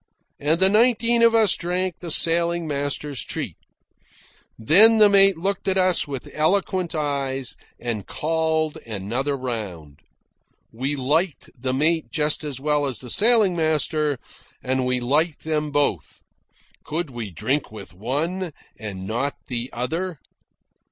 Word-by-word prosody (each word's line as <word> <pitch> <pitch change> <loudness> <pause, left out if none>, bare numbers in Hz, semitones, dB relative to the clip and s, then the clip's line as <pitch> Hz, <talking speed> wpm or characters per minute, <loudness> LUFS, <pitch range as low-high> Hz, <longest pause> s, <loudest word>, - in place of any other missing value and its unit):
And 155 +4 +1
the 190 - +6
nineteen 235 +2 +3
of 230 0 +5
us 220 -4 +4
drank 180 +1 -2
the 175 - -7
sailing 170 +1 +2
master's 145 -3 -2
treat. - - -4 1.0
Then 200 - +6
the 210 -1 +6
mate 195 -2 +7
looked 195 +4 -2
at 190 0 +1
us 185 -3 +2
with 135 -3 -6
eloquent 180 +2 0
eyes 135 -4 -2 0.2
and 115 -4 -4
called 160 -1 -1
another 115 +7 -3
round. 95 - -6 0.7
We 130 +6 -3
liked 150 +5 -1
the 130 0 -3
mate 160 +3 +1
just 150 -1 -1
as 145 -4 -4
well 145 0 +1
as 130 -4 -3
the 125 0 -5
sailing 215 -4 +5
master, 155 -2 0 0.5
and 130 0 -1
we 125 0 0
liked 145 +6 0
them 155 -1 -1
both. 145 0 -1 0.6
Could 160 -1 -4
we 120 -4 -6
drink 130 - -2
with 105 -4 -10
one, 155 - -3 0.3
and 100 -3 -7
not 120 +7 -2
the 120 0 -3
other? 165 +8 -3
150 Hz, 140 wpm, -23 LUFS, 130-175 Hz, 1.0 s, mate